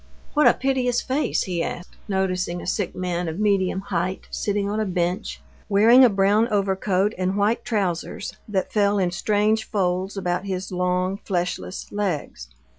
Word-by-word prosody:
What 300 0 +5
a - - +6
piteous 255 -2 +1
face!" 275 +3 0
he 175 -3 -2
asked, 175 +1 -5
noticing 185 -3 -1
a - - -8
sick 190 +1 -2
man 180 -1 -2
of 160 +1 -4
medium 195 -2 +1
height 185 -1 -3
sitting 205 -1 -1
on 210 +2 -1
a - - +1
bench, 180 -1 -2 0.3
wearing 225 +6 +7
a 250 - +7
brown 205 +3 +3
overcoat 195 0 +1
and 185 +2 0
white 210 +3 +1
trousers 190 -7 -2
that 195 -3 -2
fell 205 -1 +3
in 185 -3 +1
strange 210 +3 +1
folds 190 0 -1
about 180 0 -1
his 190 -1 -4
long, 180 +1 0
fleshless 180 0 -3
legs. 175 - -3
195 Hz, 160 wpm, -23 LUFS, 180-210 Hz, 0.3 s, wearing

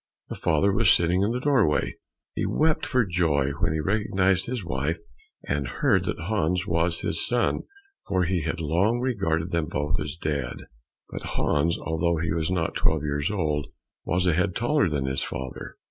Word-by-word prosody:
The - - -4
father 95 +6 +2
was 105 0 +4
sitting 85 +2 +4
in 100 - +2
the 125 - -1
doorway. 125 - +2 0.4
He - - -1
wept 155 0 +1
for 125 -3 +2
joy 80 -7 +1
when - - +1
he 80 - -1
recognized 95 +1 +1
his 120 -6 -3
wife 75 +1 -1 0.5
and 70 -2 -1
heard - - +1
that - - -3
Hans 90 -1 0
was 85 -2 0
his 80 - 0
son, 120 0 0 0.4
for 95 -2 +1
he 90 0 0
had 80 +2 -3
long 90 +9 +1
regarded 95 -10 -1
them 85 -3 0
both 75 +1 -1
as 75 -1 -4
dead. 70 -7 -3 0.5
But - - -6
Hans, 80 +3 +1
although 80 +1 0
he 80 0 -1
was 80 0 -1
not 90 -3 0
twelve 80 -2 +1
years 75 0 -1
old, 75 -8 -1 0.4
was 90 +2 0
a 90 - +3
head 90 +3 0
taller 130 - +2
than 70 -3 -1
his 65 0 -1
father. 65 -1 -6
85 Hz, 180 wpm, -26 LUFS, 75-100 Hz, 0.5 s, was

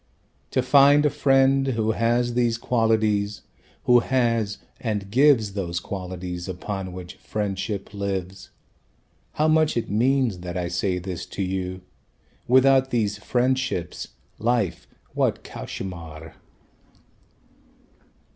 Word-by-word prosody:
To 130 - 0
find 140 +2 +6
a 150 - +3
friend 135 0 +3
who 110 -4 0
has 120 +2 +1
these 120 -1 +1
qualities, 110 -4 +1 0.4
Who 125 0 +6
has, 115 -5 0 0.2
and 105 -4 -3
gives 125 -5 +4
Those 90 -3 -2
qualities 90 -1 -6
upon 95 +1 -5
which 90 -1 -9
friendship 100 -1 -4
lives. 95 -2 -4 0.8
How 155 - +1
much 155 -3 +3
it 115 - -2
means 120 -2 +2
that 90 0 -5
I 90 -1 -2
say 90 +1 -1
this 90 -1 -5
to 100 - -4
you 95 0 -3 0.7
Without 130 +1 +5
these 110 -5 0
friendships 125 -8 -1 0.3
life, 115 -5 0 0.3
what - - 0
cauchemar!" 80 -4 -8
105 Hz, 110 wpm, -24 LUFS, 95-125 Hz, 0.8 s, find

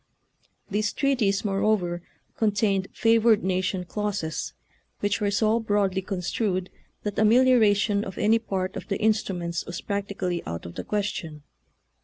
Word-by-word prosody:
These 210 +1 0
treaties, 240 -9 +1
moreover, 195 -3 +1 0.3
contained 205 -3 +1
favored 225 -1 +4
nation 185 0 0
clauses, 195 -4 -3 0.5
which 205 0 0
were 205 - +2
so 215 +3 +2
broadly 205 -3 +1
construed 185 0 -2 0.3
that 205 -1 -2
amelioration 215 -3 +4
of 190 - -7
any 220 +2 +3
part 190 -4 -3
of - - -6
the 200 - -1
instruments 185 -6 0
was 175 - -5
practically 200 -3 -3
out 85 0 -5
of 85 - -7
the - - -5
question. 195 -8 -3
200 Hz, 130 wpm, -26 LUFS, 185-215 Hz, 0.5 s, favored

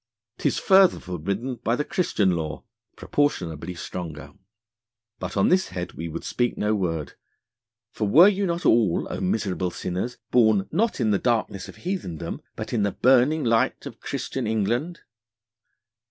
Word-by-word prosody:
'Tis - - +1
further 190 -1 +5
forbidden 100 +9 -4
by 115 0 0
the 150 - -2
Christian 105 - +1
Law 80 -3 -3 0.3
(proportionably 90 - -1
stronger). 85 -3 -7 0.9
But - - -5
on 100 - +4
this 185 +1 +3
head 90 -1 -5
we 85 - -5
would 85 +1 -6
speak 120 -1 -1
no 105 +1 +1
word, 80 -7 -2 0.8
for 105 - -2
were 170 - +7
not 185 -3 -1
you - - +7
all, 110 -7 +2
O - - -3
miserable 95 -2 -1
Sinners, 90 +8 -4
born 110 -5 +4
not 225 +2 0
in 110 - +2
the 100 - +2
Darkness 115 -5 -1
of - - -11
Heathendom, 175 - -5
but - - -6
in 115 - +1
the 100 -2 0
burning 135 +5 +4
Light 115 -2 +1
of - - -9
Christian - - -4
England? 120 - -1
110 Hz, 155 wpm, -24 LUFS, 90-135 Hz, 0.9 s, were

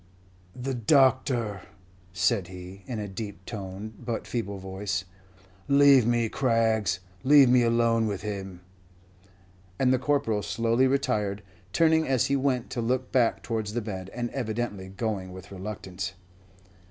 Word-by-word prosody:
"The 135 +2 -2
doctor!" 125 -4 +2 0.5
said 90 +2 +1
he, 90 +1 -10
in 120 - -4
a 105 -1 -4
deep 100 -1 -7
toned 105 +1 -7
but 115 -1 -3
feeble 100 -5 -3
voice. 95 -1 -3 0.6
"Leave 140 -4 +6
me, 120 -1 +2
Craggs 110 -6 +1 0.2
leave 140 -1 +7
me 125 0 +5
alone 115 -1 +2
with 100 -3 -4
him." 95 -4 -5 1.2
And 130 -1 +3
the 130 - +2
Corporal 130 -6 +1
slowly 115 +5 +1
retired, 105 -7 0 0.3
turning 160 +4 +3
as 130 -3 +2
he 140 - +1
went 130 -3 0
to 120 - -2
look 130 +2 -1
back 120 -3 +2
towards 110 -3 -3
the 120 - -1
bed, 95 -4 -6
and 120 -1 -4
evidently 110 -6 -3
going 95 -2 -3
with 95 +2 -11
reluctance. 95 -2 -6
115 Hz, 140 wpm, -27 LUFS, 100-125 Hz, 1.2 s, leave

